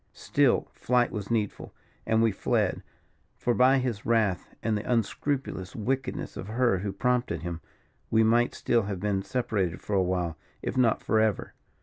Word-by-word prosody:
"Still - - +2
flight 125 0 +1
was 105 -3 -5
needful, 110 -4 -2 0.3
and 110 0 +3
we 115 - +4
fled; 95 - 0 0.6
for 120 - +1
by 130 +3 +5
his 125 -5 -2
wrath, 110 -6 +1
and 110 -1 +1
the 105 +4 -3
unscrupulous 120 -3 -1
wickedness 130 +4 -2
of 95 - -6
her 115 -3 +2
who 100 +1 -3
prompted 120 -5 0
him, 85 -2 -4 0.5
we 110 0 +4
might 120 +2 +3
still 120 -1 +2
have 100 -2 -4
been 100 0 0
separated 100 -7 -1
for 105 - -5
a 95 - +4
while, 90 -3 -1 0.2
if - - -3
not 125 -3 +2
for 110 - +2
ever. 110 -2 0
110 Hz, 165 wpm, -28 LUFS, 95-120 Hz, 0.6 s, by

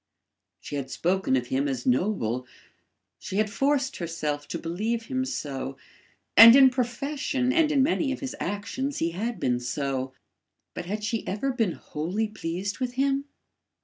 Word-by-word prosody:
She 145 - -5
had 135 -2 -4
spoken 180 -5 +1
of 125 -1 0
him 135 +2 +1
as 130 -3 -3
noble; 125 - 0 0.7
she - - -6
had 215 0 +1
forced 275 +2 +1
herself 155 -4 -3
to - - -3
believe 215 +8 -2
him 260 +2 -2
so, 135 - -4 0.6
and 230 +2 +11
in 265 -1 +8
profession 260 +1 -1
and 320 -2 +3
in 275 -3 +4
many 285 -1 +1
of 270 - -3
his 265 -2 -5
actions 205 +9 -3
he 165 +1 0
had 220 +7 -3
been 125 -1 +1
so, 130 +1 -3 0.6
but 175 - -6
had 210 +3 -3
she 225 +1 -2
ever 225 +8 -1
been 225 -8 0
wholly 180 +9 -3
pleased 195 0 -4
with 250 -1 -2
him? 275 +1 +1
210 Hz, 160 wpm, -26 LUFS, -, 0.7 s, and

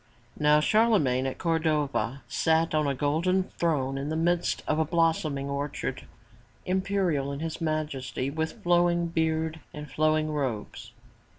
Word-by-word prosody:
Now 150 0 +5
Charlemagne 150 - +3
at 130 - -4
Cordova, 150 -7 0
sat 160 0 +1
on 155 -1 +2
a 140 - 0
golden 165 +7 +1
throne 135 -7 -1
in 140 +2 -3
the 155 - -2
midst 170 +2 0
of 155 - +1
a - - +4
blossoming 160 -3 0
orchard, 140 -2 -4 0.6
imperial 185 -7 0
in 140 - -5
his 165 +1 -4
majesty, 140 -5 -2
with 160 +2 -4
flow 175 0 +4
ing 170 0 0
beard 160 -1 -1 0.2
and 150 0 -7
flowing 155 +2 +1
robes. 130 -8 -4
155 Hz, 140 wpm, -27 LUFS, 140-165 Hz, 0.6 s, Now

